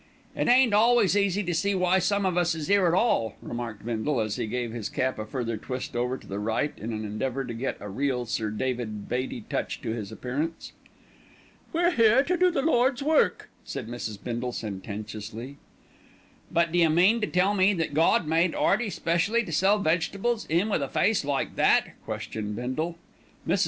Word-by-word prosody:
"It - - 0
ain't 250 -3 +5
always 225 -2 +4
easy 200 0 +2
to 175 -1 -2
see 200 +4 +1
why 185 0 +3
some 200 +2 +1
of 185 -2 +1
us 175 -2 +2
is 160 +4 -3
'ere 200 -3 +5
at 170 - +2
all," 180 - +1
remarked 115 -4 -6
Bindle, 120 +4 -1
as 110 -1 -1
he 120 -3 -3
gave 120 +1 -3
his 115 -4 -4
cap 130 -3 -1
a 110 - -5
further 115 -2 -3
twist 125 +1 -6
over 125 +2 -1
to - - -16
the 100 +1 -5
right 110 +8 -1
in 115 +3 -6
an 110 -1 -4
endeavour 130 +6 -3
to 120 - -5
get 120 +4 -3
a 105 - -7
real 125 +4 -1
Sir 110 -2 -2
David 110 -2 -3
Beatty 125 0 -3
touch - - -3
to - - -2
his 110 -3 -5
appearance. 150 +7 -4 1.0
"We're 345 +2 +2
here 235 -2 +5
to 360 +5 0
do 365 +1 +4
the 275 -6 -1
Lord's 260 -3 +2
work," 315 +2 +2
said - - -6
Mrs. 115 -3 -5
Bindle 120 +1 -3
sententiously 110 +5 -6 0.9
"But 170 -1 +1
d'you 170 -1 +4
mean 185 +9 +4
to 210 - 0
tell 185 +3 +2
me 195 0 +4
that 165 -4 -2
Gawd 160 +2 +3
made 165 +2 +2
'Earty 215 +2 +2
specially 185 +7 +1
to 185 - -7
sell 195 +6 +3
vegetables, 200 +6 0
'im 175 +7 +2
with 200 - 0
a 140 - -2
face 220 -5 +2
like 140 -1 -2
that?" - - +3
questioned 105 -1 -4
Bindle. 155 +9 -3 0.5
Mrs. - - +2
155 Hz, 195 wpm, -27 LUFS, 120-200 Hz, 1.0 s, ain't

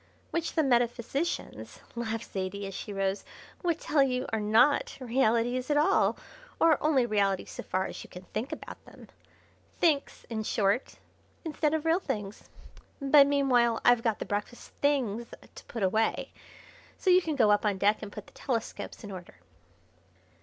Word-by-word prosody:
"Which 335 -1 -2
the 320 - +2
metaphysicians," 245 +4 -1
laughed 230 -1 -4
Zaidie 195 +1 -3
as 195 - -6
she 205 - -6
rose, 195 0 -1 0.4
"would 340 -3 0
tell 295 -2 +2
you 255 -2 +1
are 220 - +1
not 220 +7 +3
realities 245 0 +1
at 295 - +3
all, 315 +7 +3 0.4
or 325 -3 +4
only 285 -5 +3
realities 200 -4 0
so - - -6
far 185 0 -1
as - - -7
you - - -14
can 180 0 -10
think 235 +6 -3
about - - -8
them. - - -15 0.7
'Thinks,' 300 -5 +1
in 225 -2 -3
short, 210 +2 0 0.5
instead 310 -1 0
of 315 0 -3
real 325 +2 +3
things. 210 - -5 0.5
But 275 0 +6
meanwhile 250 -5 +3
I've 245 -1 +6
got 225 -3 0
the - - -5
breakfast 205 +4 -4
things 240 -6 +1 0.3
to - - -12
put 230 -4 -5
away, 220 +4 0 0.7
so 375 - +2
you 365 +1 +6
can 320 -3 -2
go 220 -6 +4
up 205 - +3
on 205 -2 +1
deck 205 +3 +2
and 200 - -7
put 210 - -9
the - - -20
telescopes 235 -2 -4
in 205 - -7
order." 180 - -9
235 Hz, 165 wpm, -29 LUFS, 210-285 Hz, 0.7 s, But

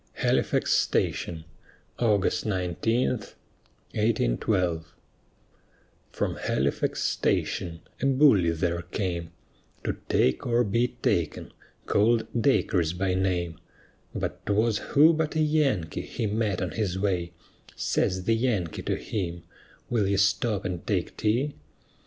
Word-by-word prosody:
HALIFAX - - +1
STATION 80 -2 0 0.5
[August 105 -5 +2
19, 100 +4 0 0.8
1812] 90 - 0 1.2
From - - -2
Halifax 70 +2 -1
station 85 -1 -1 0.2
a 135 - +2
bully 130 - +5
there 85 +1 -1
came, 85 -1 -3 0.5
To - - -1
take 65 - +2
or 120 0 +3
be 115 +3 +1 0.2
taken, - - 0 0.3
call'd 110 +2 +3
Dacres 95 - +2
by 95 +1 0
name: 90 -3 -1 0.6
But - - -4
'twas 105 +1 +2
who 155 +3 +5
but 160 -1 -1
a - - +1
Yankee 150 - +1
he - - -4
met 105 -3 0
on 90 - -3
his 100 -5 -2
way 90 -3 -1 0.4
Says 95 0 0
the 115 - +2
Yankee 110 -9 -1
to - - -1
him, 85 -5 -4 0.5
"Will 110 -5 +2
you 100 0 +1
stop 100 +1 +1
and 90 -2 -3
take - - -1
tea?" 120 +7 0
100 Hz, 115 wpm, -27 LUFS, 85-115 Hz, 1.2 s, bully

